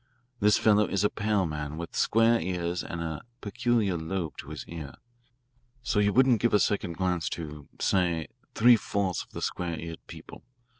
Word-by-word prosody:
This 105 0 +4
fellow 105 -1 +4
is 100 0 0
a 105 - +2
pale 105 -3 0
man 75 -1 -4
with 85 0 -7
square 115 +1 +3
ears 90 0 -2
and 85 - -5
a 80 -2 -4 0.2
peculiar 110 -2 0
lobe 80 0 -3
to - - -8
his - - -7
ear. 80 -5 -8 0.9
So 125 -6 +1
you 105 0 +3
wouldn't 125 -1 +4
give 120 -2 +3
a - - +5
second 100 -5 0
glance 90 -1 -1
to, 75 -3 -8
say, 85 -4 +1 0.3
three 120 +1 +7
fourths 100 -3 -1
of - - -12
the - - -7
square 85 -2 -2
eared 85 0 -7
people. - - -11
95 Hz, 180 wpm, -28 LUFS, 85-105 Hz, 0.9 s, three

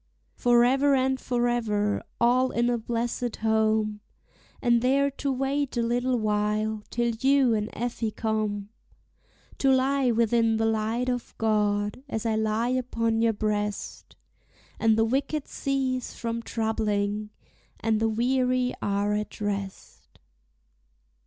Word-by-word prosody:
Forever 250 +4 +4
and 265 0 +1
forever, 240 -5 0 0.2
all 250 +2 +3
in 240 0 +1
a 240 - 0
blessèd 235 +1 -2
home, 220 -1 +1 0.6
And 235 -1 +3
there 275 +3 +2
to 275 0 -3
wait 270 0 -1
a 235 - +2
little 245 +2 +1
while 210 0 0
till 235 0 0
you 270 -2 +4
and 210 0 -1
Effie 235 -1 -2
come, 215 -2 -2 0.9
To 270 - +3
lie 265 0 +2
within 230 -1 +2
the 225 - +1
light 225 +3 0
of 245 -1 -3
God, 210 0 0
as 220 -2 -3
I 225 -1 +1
lie 220 +2 0
upon 230 -3 0
your 230 -1 +3
breast, 210 -1 -3 0.6
And 220 -1 +3
the 225 - +3
wicked 275 +4 -1
cease 265 -2 -2
from 230 0 -3
troubling, 215 -2 -1 0.5
and 220 -1 +1
the 225 0 +1
weary 250 +2 +1
are 205 +1 0
at 210 0 -4
rest. 200 -2 -5
230 Hz, 125 wpm, -26 LUFS, 215-250 Hz, 0.9 s, Forever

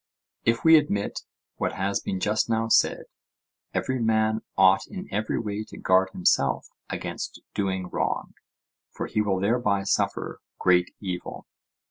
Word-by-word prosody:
If 115 0 +2
we 160 0 +8
admit 100 -10 -1 0.4
what - - -1
has 100 +1 -1
been 95 - -3
just 105 +4 +1
now 115 0 +1
said, - - +3 0.7
every 130 -1 -1
man 110 -1 +2 0.2
ought 95 0 +5
in 195 -1 -7
every 110 +1 -1
way 105 -1 -3
to - - -12
guard 95 +1 +3
himself 90 -1 +1 0.2
against - - -5
doing 95 -2 -1
wrong, - - -2 0.6
for - - -5
he 105 - 0
will 100 -3 0
thereby 100 -1 +1
suffer - - -1 0.2
great 90 -1 +3
evil? 90 -3 -5
100 Hz, 140 wpm, -26 LUFS, 95-115 Hz, 0.7 s, we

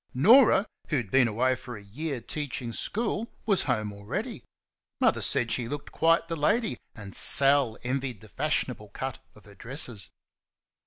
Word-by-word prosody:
Norah, 215 - +6 0.2
who 155 - 0
had 115 -7 -4
been 130 -2 +5
away 125 +4 +1
for 125 -2 -7
a 105 - -12
year 135 +6 -5
teaching 125 -3 -4
school, 225 - -1 0.2
was 200 -5 +3
home 110 -5 -1
already. 100 0 -5 0.6
Mother - - +3
said 115 -1 0
she 120 -2 +1
looked 145 +3 -6
quite 165 +1 +3
the 165 - -3
lady, 210 +10 +1 0.2
and 100 -4 -10
Sal 135 -4 +3
envied 130 -3 -3
the 110 - -13
fashionable 125 -5 -2
cut 130 +5 -5 0.2
of 105 - -18
her 100 - -14
dresses. 120 -3 -4
130 Hz, 160 wpm, -28 LUFS, 115-155 Hz, 0.6 s, Norah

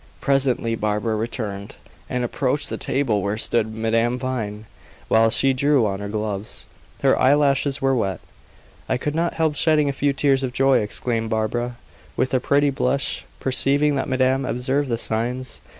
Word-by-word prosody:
Presently 130 -4 +1
Barbara 110 0 -1
returned, 105 -3 -4 0.3
and 125 -1 -1
approached 140 +4 -1
the - - -3
table 120 -7 0
where 100 +3 -2
stood 110 -1 0
Madame 115 +2 0
Vine, 110 -5 -4 0.4
while 115 0 +5
she 135 +4 +3
drew 140 -2 +3
on 95 -2 -2
her 100 0 -5
gloves. 105 0 -4 0.4
Her - - +5
eyelashes 140 0 +2
were 135 0 +3
wet. 100 -6 -1 0.7
"I - - +1
could 145 +3 -3
not 170 +2 -1
help 160 -2 +1
shedding 150 -1 +2
a - - -1
few 140 +1 +1
tears 135 -1 +2
of 130 -2 -3
joy," 135 0 +3
exclaimed 115 +2 -2
Barbara, 120 +2 -1 0.4
with 130 - 0
a 130 - +3
pretty 140 +2 +2
blush, 135 +1 -1
perceiving 140 +3 +3
that 135 -1 -2
madame 130 +1 +2
observed 130 +3 -1
the 115 - 0
signs. 120 +3 -3
"Mr. - - -28
125 Hz, 165 wpm, -22 LUFS, 110-140 Hz, 0.7 s, while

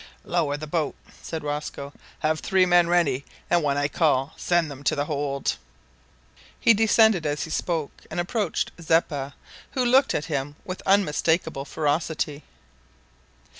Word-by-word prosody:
"Lower 155 -5 0
the 155 - -6
boat" 155 -1 -1 0.3
said 160 -2 -5
Rosco. 145 -1 -4 0.3
"Have 155 0 +1
three 190 -1 +3
men 175 -1 +4
ready, 160 -6 +2 0.3
and, 175 - +4
when 140 -2 0
I 145 0 +1
call, 145 -3 +1
send 175 -3 +1
them 140 0 -10
to 155 - +2
the 145 0 -1
hold." 140 - -2 1.0
He 230 - +6
descended 220 -3 +4
as 145 0 -1
he 160 - -7
spoke, 160 -4 -2
and - - -4
approached 205 +5 -1
Zeppa, 150 -4 0 0.4
who 255 -2 +1
looked 265 +3 +4
at 150 - -1
him 145 -2 -3
with 185 0 -6
unmistakable 160 -5 +2
ferocity. 150 0 -1
155 Hz, 145 wpm, -25 LUFS, 145-175 Hz, 1.0 s, He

